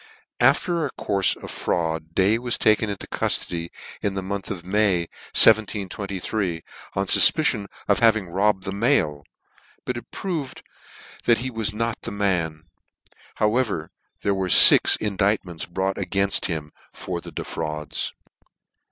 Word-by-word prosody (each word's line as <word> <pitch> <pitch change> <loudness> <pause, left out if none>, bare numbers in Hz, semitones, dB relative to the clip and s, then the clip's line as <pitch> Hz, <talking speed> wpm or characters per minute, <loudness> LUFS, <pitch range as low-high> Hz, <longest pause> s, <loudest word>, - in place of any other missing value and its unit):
After 170 -2 +2
a 145 - -2
courie 100 -2 +1
of - - -7
fraud 80 -1 -3
Day 100 +4 +3
was 120 -1 -1
taken 110 0 +2
into 100 - -6
cuilody 85 -1 -2 0.3
in 100 -1 -2
the 95 - -3
month 100 +1 -5
of 90 -3 -6
May, 100 -2 +2 0.4
1723, 100 -3 +2 0.3
on 95 - 0
fufpicion 115 - +4 0.2
of 100 - +3
his - - -3
having 110 -5 +3
robbed 95 +2 +1
the 95 - -4
mail; 100 - +1 0.6
but 125 - -3
it 120 - -10
proved 155 -9 -5 0.6
that 120 - +4
he 130 +2 -4
was 110 -2 -1
not 115 +2 -3
the - - -6
man: 90 -6 -1 0.7
however, 105 -7 0 0.3
there 100 - +1
were 95 -1 -2
fix - - +8
in 105 -3 -4
dictments 95 -4 -1
brought 95 +2 -2
againft 100 0 0
him 80 -4 -4 0.2
for - - -6
the - - -10
defrauds. 75 -2 -4
100 Hz, 145 wpm, -23 LUFS, 90-110 Hz, 0.7 s, fix